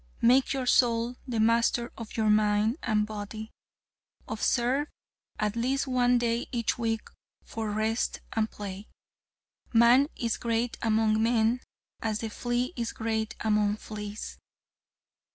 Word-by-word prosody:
Make 255 Hz, +3 st, +5 dB
your 270 Hz, -2 st, -1 dB
soul 240 Hz, 0 st, +3 dB
the 235 Hz, -3 st, -2 dB
master 230 Hz, +2 st, +2 dB
of 230 Hz, -1 st, -8 dB
your 215 Hz, -1 st, +3 dB
mind 210 Hz, +3 st, +2 dB
and 215 Hz, -3 st, +1 dB
body. 215 Hz, +1 st, -7 dB, 0.8 s
Observe 245 Hz, +6 st, +1 dB, 0.5 s
at 210 Hz, 0 st, 0 dB
least 260 Hz, +4 st, 0 dB
one 250 Hz, -2 st, +3 dB
day 235 Hz, 0 st, 0 dB
each 235 Hz, -3 st, 0 dB
week 225 Hz, -1 st, -1 dB, 0.4 s
for 220 Hz, -1 st, -4 dB
rest 220 Hz, +2 st, -1 dB
and 220 Hz, -1 st, 0 dB
play. 200 Hz, 0 st, -7 dB, 0.8 s
Man 240 Hz, +4 st, +6 dB
is 230 Hz, -2 st, -1 dB
great 235 Hz, +1 st, -1 dB
among 220 Hz, -1 st, +2 dB
men 230 Hz, +1 st, +2 dB, 0.4 s
as 220 Hz, -2 st, -1 dB
the 225 Hz, -1 st, -4 dB
flea 245 Hz, +6 st, -1 dB
is 235 Hz, -2 st, -3 dB
great 220 Hz, -1 st, -2 dB
among 210 Hz, -1 st, +2 dB
fleas. 210 Hz, 0 st, -7 dB
225 Hz, 130 wpm, -28 LUFS, 215-240 Hz, 0.8 s, Man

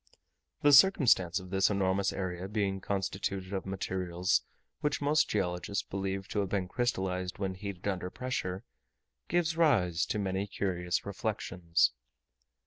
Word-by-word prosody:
The 145 Hz, 0 st, +6 dB
circumstance 130 Hz, -, +6 dB
of 95 Hz, -1 st, -11 dB
this 95 Hz, -1 st, +3 dB
enormous 100 Hz, -1 st, +1 dB
area 95 Hz, -1 st, -4 dB
being 100 Hz, -2 st, -1 dB
constituted 95 Hz, 0 st, -2 dB
of 95 Hz, -1 st, -3 dB
materials 95 Hz, -2 st, 0 dB, 0.4 s
which 150 Hz, -1 st, 0 dB
most 150 Hz, +2 st, +2 dB
geologists 95 Hz, 0 st, -1 dB
believe 95 Hz, 0 st, -3 dB
to 105 Hz, -, -1 dB
have 100 Hz, -2 st, -1 dB
been 95 Hz, -2 st, -1 dB
crystallized 95 Hz, -6 st, -1 dB
when 95 Hz, -1 st, -2 dB
heated 95 Hz, 0 st, -6 dB
under 90 Hz, -2 st, -2 dB
pressure, 95 Hz, -6 st, -3 dB, 0.6 s
gives 170 Hz, -1 st, +1 dB
rise 110 Hz, -, +3 dB
to -, -, -1 dB
many 95 Hz, 0 st, -1 dB
curious 90 Hz, -3 st, -2 dB
reflections. 95 Hz, -, 0 dB
95 Hz, 135 wpm, -31 LUFS, 90-105 Hz, 0.6 s, The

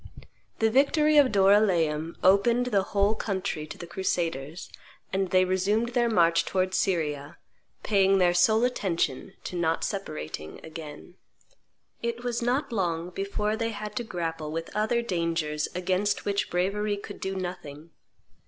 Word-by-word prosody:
The 225 Hz, 0 st, +2 dB
victory 300 Hz, +4 st, +4 dB
of 280 Hz, -3 st, +6 dB
Doryleum 185 Hz, -6 st, +3 dB
opened 230 Hz, +6 st, +4 dB
the 210 Hz, -6 st, +2 dB
whole 200 Hz, +2 st, +1 dB
country 190 Hz, -7 st, -3 dB
to -, -, -9 dB
the 175 Hz, -, -7 dB
crusaders, 170 Hz, -4 st, -3 dB, 0.5 s
and 190 Hz, -1 st, 0 dB
they 185 Hz, 0 st, +4 dB
resumed 200 Hz, +5 st, +1 dB
their 240 Hz, -1 st, +1 dB
march 170 Hz, -5 st, +4 dB
towards 185 Hz, 0 st, -1 dB
Syria, 150 Hz, -6 st, -1 dB, 0.5 s
paying 195 Hz, -2 st, +3 dB
their 180 Hz, -2 st, +4 dB
sole 220 Hz, +6 st, +4 dB
attention 190 Hz, -, -1 dB
to -, -, -6 dB
not 165 Hz, -1 st, 0 dB
separating 155 Hz, -, -5 dB
again. 160 Hz, +2 st, -10 dB, 0.8 s
It 235 Hz, +1 st, -3 dB
was 240 Hz, -1 st, -2 dB
not 245 Hz, +4 st, 0 dB
long 175 Hz, -5 st, -1 dB
before 200 Hz, +3 st, -2 dB
they 230 Hz, 0 st, -1 dB
had 210 Hz, -1 st, -6 dB
to 240 Hz, -, -1 dB
grapple 165 Hz, -6 st, -4 dB
with 165 Hz, +3 st, -5 dB
other 220 Hz, +3 st, +1 dB
dangers 165 Hz, -6 st, -1 dB
against 190 Hz, +3 st, 0 dB
which 200 Hz, 0 st, 0 dB
bravery 205 Hz, +4 st, 0 dB
could 205 Hz, 0 st, -9 dB
do 190 Hz, 0 st, -3 dB
nothing. 170 Hz, -4 st, -6 dB
190 Hz, 145 wpm, -27 LUFS, 170-215 Hz, 0.8 s, of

